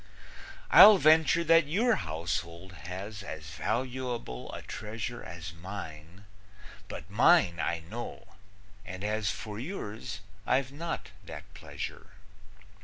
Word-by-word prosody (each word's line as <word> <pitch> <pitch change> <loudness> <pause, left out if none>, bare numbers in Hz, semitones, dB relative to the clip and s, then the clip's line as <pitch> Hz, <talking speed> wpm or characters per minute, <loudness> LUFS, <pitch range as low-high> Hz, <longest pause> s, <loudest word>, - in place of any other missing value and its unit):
I'll 210 -1 +11
venture 160 0 +5
that 165 -2 +5
your 220 +10 +3
household 85 +2 -4 0.2
has 100 +3 -6
As 80 -5 -7
valuable 120 - -3
a - - -7
treasure 110 +3 -5
As 85 -1 -8
mine, 85 0 -9 0.6
but - - -8
mine 85 -1 +4
I 85 0 -1
know, 110 +9 -8 0.5
and 95 +1 -7
as 105 -1 0
For 105 +3 -5
yours, 110 - -6 0.3
I've 130 0 +2
not 165 +4 -5
that - - -8
pleasure. 95 -3 -7
105 Hz, 110 wpm, -30 LUFS, 85-130 Hz, 0.6 s, I'll